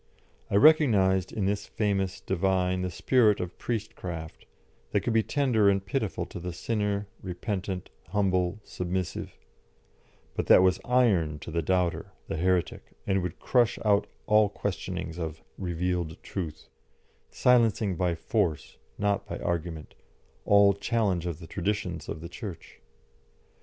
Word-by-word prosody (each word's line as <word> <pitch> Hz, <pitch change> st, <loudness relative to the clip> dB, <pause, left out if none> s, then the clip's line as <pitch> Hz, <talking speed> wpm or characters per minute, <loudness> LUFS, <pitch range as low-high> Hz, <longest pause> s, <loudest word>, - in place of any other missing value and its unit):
I -, -, -1 dB
recognised 100 Hz, -, +5 dB
in 105 Hz, -4 st, -2 dB
this 100 Hz, +1 st, -1 dB
famous 100 Hz, -3 st, -1 dB
divine 95 Hz, 0 st, +1 dB
the 90 Hz, -, -1 dB
spirit 110 Hz, +3 st, +3 dB
of 90 Hz, -1 st, -5 dB
priest 115 Hz, -4 st, -3 dB
craft, 80 Hz, -3 st, -7 dB, 0.4 s
that -, -, +1 dB
could 120 Hz, -, -1 dB
be 110 Hz, -, +4 dB
tender 115 Hz, -5 st, +2 dB
and 100 Hz, -1 st, +1 dB
pitiful 105 Hz, -2 st, -2 dB
to -, -, -8 dB
the 90 Hz, 0 st, -5 dB
sinner, 105 Hz, +1 st, -1 dB, 0.2 s
repentant, 95 Hz, 0 st, -4 dB, 0.2 s
humble, 95 Hz, 0 st, +1 dB
submissive; 90 Hz, 0 st, -4 dB, 1.0 s
but -, -, -3 dB
that 90 Hz, -, +8 dB
was 95 Hz, 0 st, +3 dB
iron 100 Hz, -12 st, +3 dB
to -, -, -7 dB
the 85 Hz, +1 st, 0 dB
doubter, 90 Hz, +1 st, 0 dB
the -, -, -3 dB
heretic, 90 Hz, 0 st, 0 dB
and 95 Hz, -1 st, +1 dB
would 90 Hz, -1 st, -4 dB
crush 120 Hz, -3 st, +2 dB
out 100 Hz, -1 st, +3 dB, 0.2 s
all 105 Hz, -1 st, +4 dB
questionings 85 Hz, -3 st, -4 dB
of 80 Hz, -1 st, -5 dB, 0.2 s
"revealed 90 Hz, -2 st, -2 dB
truth," 80 Hz, -5 st, -5 dB, 0.6 s
silencing 115 Hz, -5 st, +3 dB
by 90 Hz, 0 st, 0 dB
force, 80 Hz, -1 st, -1 dB, 0.2 s
not 100 Hz, -1 st, 0 dB
by -, -, -4 dB
argument, 85 Hz, -2 st, -3 dB, 0.5 s
all 100 Hz, 0 st, +6 dB
challenge 100 Hz, -4 st, 0 dB
of 85 Hz, -4 st, -3 dB
the 85 Hz, -, -10 dB
traditions 100 Hz, +5 st, -3 dB
of 80 Hz, -, -5 dB
the 85 Hz, -, -6 dB
Church. 90 Hz, -1 st, -9 dB
95 Hz, 140 wpm, -28 LUFS, 85-105 Hz, 1.0 s, that